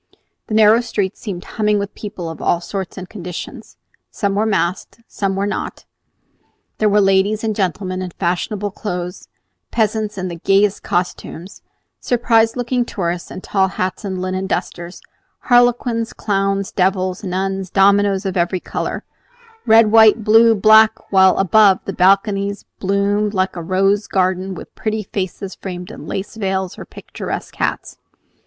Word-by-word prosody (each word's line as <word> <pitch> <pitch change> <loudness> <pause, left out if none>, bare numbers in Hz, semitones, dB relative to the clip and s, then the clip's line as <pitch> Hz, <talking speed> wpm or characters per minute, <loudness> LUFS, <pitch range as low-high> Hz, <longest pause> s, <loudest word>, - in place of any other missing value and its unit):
The 215 - -2
narrow 220 +2 +6
street 205 -5 -2
seemed 190 -5 -6
humming 210 -2 0
with 200 0 -4
people 200 -5 -7
of 165 - -7
all 170 - +1
sorts 190 +2 -6
and 185 -1 -7
conditions. 180 -4 -8 0.3
Some 200 -2 -2
were 210 +2 +1
masked; 190 0 -1
some 195 -1 -2
were 195 +1 -1
not. 205 - -4 0.9
There 215 - +3
were 205 +1 +4
ladies 195 +2 +2
and 220 -1 -1
gentlemen 185 -1 -2
in 185 - -4
fashionable 195 +4 -2
clothes, 180 -3 -5 0.4
peasants 215 -2 -1
in 185 -1 -3
the 170 -1 -6
gayest 195 +3 +2
costumes, 175 0 -4 0.4
surprised 230 -1 +2
looking 245 0 0
tourists 175 -6 -4
in 185 - -8
tall 190 -1 +1
hats 185 +1 -3
and 190 -2 -4
linen 185 +1 -3
dusters, 175 -1 -4 0.3
harlequins, 245 -2 +2
clowns, 195 -1 -1
devils, 185 +1 0
nuns, 190 0 -2
dominoes 200 0 +3
of 190 - -2
every 180 +1 0
color, - - -4 0.6
red, 220 -1 +6
white, 220 0 +6
blue, 225 +1 +5
black; 220 +2 +4
while 190 -1 +5
above, 195 0 +5
the 195 - -4
balconies 200 +2 +1
bloomed 200 +2 0
like 185 0 0
a 170 - -5
rose 195 +4 +1
garden 185 0 0
with - - -11
pretty 215 -1 -3
faces 195 0 -5
framed 180 +1 -7
in - - -10
lace 200 +3 -5
veils 190 -3 -2
or - - -8
picturesque - - -7
hats. - - -3
195 Hz, 150 wpm, -18 LUFS, 185-215 Hz, 0.9 s, narrow